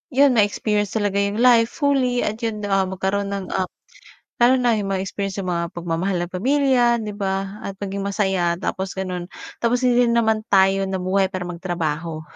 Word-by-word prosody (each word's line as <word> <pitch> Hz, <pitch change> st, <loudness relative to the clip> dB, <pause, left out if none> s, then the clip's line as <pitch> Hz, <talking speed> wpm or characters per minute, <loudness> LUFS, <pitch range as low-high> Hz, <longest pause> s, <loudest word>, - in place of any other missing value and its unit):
'yon, 275 Hz, 0 st, +6 dB
ma-experience 210 Hz, -1 st, +1 dB
talaga 205 Hz, -2 st, 0 dB
'yong 200 Hz, +1 st, 0 dB
life 235 Hz, -2 st, +6 dB
fully 265 Hz, -4 st, +1 dB
at 215 Hz, +2 st, -2 dB
'yon, 220 Hz, -2 st, -3 dB
ah, 195 Hz, -1 st, +2 dB
magkaroon 195 Hz, +2 st, -2 dB
ng, 200 Hz, -2 st, -5 dB
ah, 185 Hz, -1 st, 0 dB, 0.7 s
lalo 245 Hz, +2 st, +5 dB
na 235 Hz, -3 st, +2 dB
'yong 200 Hz, -, -3 dB
ma-experience, 195 Hz, +1 st, -3 dB
'yong 185 Hz, -, -3 dB
mga 170 Hz, -1 st, -1 dB
pagmamahal 175 Hz, +2 st, -2 dB
ng 175 Hz, -, -5 dB
pamilya, 265 Hz, +2 st, +3 dB, 0.2 s
'di 210 Hz, -1 st, -6 dB
ba, 195 Hz, +1 st, -2 dB
at 195 Hz, -, -5 dB
maging 195 Hz, 0 st, -3 dB
masaya. 190 Hz, -4 st, 0 dB
Tapos 190 Hz, 0 st, -3 dB
gano'n. 180 Hz, -2 st, -4 dB, 0.3 s
Tapos 240 Hz, +1 st, +1 dB
hindi 245 Hz, -1 st, +4 dB
rin 235 Hz, -, +1 dB
naman 220 Hz, -2 st, +2 dB
tayo 195 Hz, -1 st, +3 dB
nabuhay 190 Hz, 0 st, 0 dB
para 185 Hz, -1 st, -3 dB
magtrabaho. 165 Hz, -2 st, -3 dB
200 Hz, 175 wpm, -22 LUFS, 185-225 Hz, 0.7 s, yon